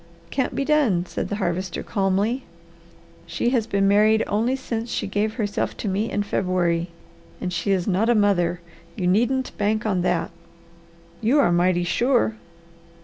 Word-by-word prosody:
"Can't 265 -2 -1
be 275 - -1
done!" 260 - +2
said - - -4
the 205 - -2
Harvester 185 -2 -2
calmly. 205 +5 0 0.8
"She 235 - 0
has 235 -4 0
been 195 0 +1
married 215 +2 +4
only 230 +5 0
since 235 -3 -4
she - - -2
gave 210 +2 -1
herself 205 -4 -2
to - - -4
me 205 +4 -1
in 205 - -1
February, 180 -3 0 0.5
and 180 - -3
she 175 +4 -2
is 190 -3 +1
not 205 +4 +1
a 240 - +4
mother. 180 -4 +2 0.3
You 180 - -3
needn't 245 +8 +1
bank 210 +1 0
on 190 -4 +1
that." 175 -1 0 0.9
"You 235 +6 +3
are 225 - +4
mighty 175 0 +2
sure!" 240 +5 +2
205 Hz, 160 wpm, -23 LUFS, 185-230 Hz, 0.9 s, married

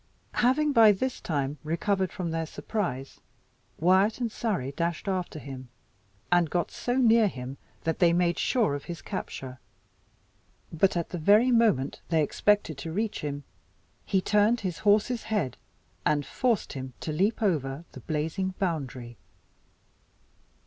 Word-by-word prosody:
Having 280 +5 +3
by 225 -5 +7
this 255 +6 -3
time 145 -2 -2
recovered 185 +4 0
from 175 -3 -4
their 165 0 -2
surprise, 140 - -4 0.6
Wyat 190 +7 +3
and 235 -3 -1
Surrey 195 - -2
dashed 170 +5 -2
after 185 -4 -2
him, 130 -3 -8 0.6
and 175 -2 +4
got 175 +1 -1
so 245 - -2
near 230 -4 +5
him 130 -5 -6 0.3
that 165 - -1
they 175 -2 +5
made 175 0 +1
sure 230 - +2
of 140 0 -5
his 170 -2 -6
capture. 130 -9 -6 1.1
But 180 +3 +2
at 170 - -2
the 175 - -4
very 210 +9 +5
moment 215 - +2
they 160 -2 +3
expected 185 -2 +1
to 160 +3 -5
reach 210 +5 -2
him, 145 -2 -4 0.6
he 190 - +1
turned 210 +4 +3
his 185 -4 -3
horse's 215 +3 +2
head, 205 - -1 0.5
and 145 -2 +1
forced 235 - 0
him 130 -2 -6
to 155 - -3
leap 205 +8 +1
over 150 -5 0
the - - -10
blazing 165 +5 -2
boundary. 135 - -3
175 Hz, 145 wpm, -28 LUFS, 150-210 Hz, 1.1 s, by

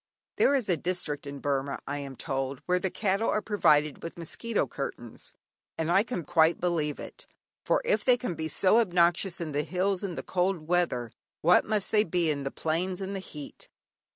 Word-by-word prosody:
There 280 - +4
is 255 -6 0
a 180 -3 +2
district 155 -4 -2
in 140 0 -6
Burmah, 140 -1 -1
I 145 +1 -3
am 140 -1 -7
told, 135 -1 -3
where 180 0 +2
the 190 - -1
cattle 200 +3 0
are - - +2
provided 155 -9 +2
with 165 - -7
mosquito 210 +7 -1
curtains, 120 -4 -7 0.4
and 165 +1 -1
I 190 +3 +5
can 215 -6 -4
quite 165 0 +3
believe 165 -4 -1
it, - - -10 0.4
for - - +2
if - - +2
they 250 -1 +5
can 245 -8 -3
be 160 -1 -3
so 190 +7 +4
obnoxious 175 -2 +2
in 165 -3 -4
the 145 +1 0
hills 185 +5 -1
in 185 -4 -3
the - - -5
cold 180 -3 -1
weather, 165 -10 0 0.3
what 175 +3 +5
must 210 -3 -1
they 210 -1 +5
be 170 -3 +1
in 140 -2 -3
the - - 0
plains 175 +6 -2
in 195 0 -4
the 195 - -3
heat! 150 -6 -10
175 Hz, 200 wpm, -28 LUFS, 150-190 Hz, 0.4 s, I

